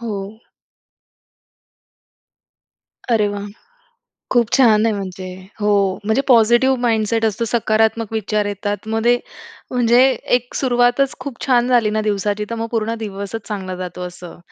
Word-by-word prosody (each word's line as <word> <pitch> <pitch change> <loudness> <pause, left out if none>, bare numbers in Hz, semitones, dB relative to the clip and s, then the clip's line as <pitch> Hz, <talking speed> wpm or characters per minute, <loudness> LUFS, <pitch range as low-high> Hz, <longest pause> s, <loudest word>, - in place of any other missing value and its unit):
हो. 215 -4 -4 2.9
अरे 220 -3 +3
वाह! 205 0 -5 0.8
खूप 235 -2 +2
छान 225 -5 +5
आहे 225 - +1
म्हणजे. 190 -2 -6 0.3
हो, 210 0 +1 0.3
म्हणजे 220 +5 +1
पॉझिटिव्ह 240 +2 +5
माइंडसेट 225 -1 +1
असतो, 220 +1 0
सकारात्मक 225 -1 0
विचार 215 -1 -1
येतात 205 0 -4
मग 220 0 -1
ते 240 0 +5 0.5
म्हणजे 240 -1 +3 0.4
एक 245 0 -8
सुरुवातच 245 +1 +2
खूप 255 -2 -7
छान 245 -2 +3
झाली 240 -4 +3
ना 215 +1 0
दिवसाची 205 +1 -1
तर - - -2
मग 230 0 -3
पूर्ण 225 -1 -1
दिवसच 200 0 -6
चांगला 190 -3 -4
जातो. 180 -1 -7
असं 180 -1 -11
220 Hz, 130 wpm, -19 LUFS, 205-240 Hz, 2.9 s, छान